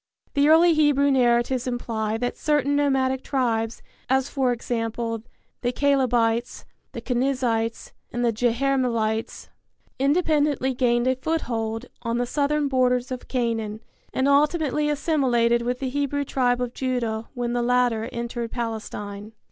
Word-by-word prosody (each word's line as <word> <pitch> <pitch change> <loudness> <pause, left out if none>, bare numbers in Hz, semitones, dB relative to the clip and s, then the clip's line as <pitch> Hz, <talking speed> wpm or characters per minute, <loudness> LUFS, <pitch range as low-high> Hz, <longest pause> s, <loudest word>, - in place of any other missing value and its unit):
The 285 +1 +3
early 330 +2 +6
Hebrew 290 -2 +3
narratives 245 0 +2
imply 225 -3 -2
that 245 +1 -2
certain 285 -2 +1
nomadic 265 -2 +1
tribes, 230 -4 -1 0.3
as, 265 +1 +2
for 265 -3 +1
example, 230 -1 -3 0.4
the 245 - 0
Calebites, 245 -4 +1 0.3
the - - -7
Kenizzites 245 -3 -1 0.2
and 240 0 -1
the 230 - +2
Jerahmeelites, 235 -2 0 0.5
independently 290 -2 +2
gained 240 -1 +1
a 260 0 +2
foothold 235 -6 -2 0.2
on 230 0 -2
the 245 - 0
southern 290 +3 0
borders 255 -1 +1
of 255 - -6
Canaan 225 -4 -2 0.3
and 265 - 0
ultimately 300 +1 +2
assimilated 255 -6 +2
with 245 +1 -1
the 265 0 -3
Hebrew 285 +1 -1
tribe 250 -2 +1
of 245 -1 -3
Judah 235 -4 -2
when 240 -1 -2
the 245 - 0
latter 240 -2 +1
entered 235 0 -4
Palestine. 215 -3 -5
250 Hz, 130 wpm, -24 LUFS, 235-275 Hz, 0.5 s, early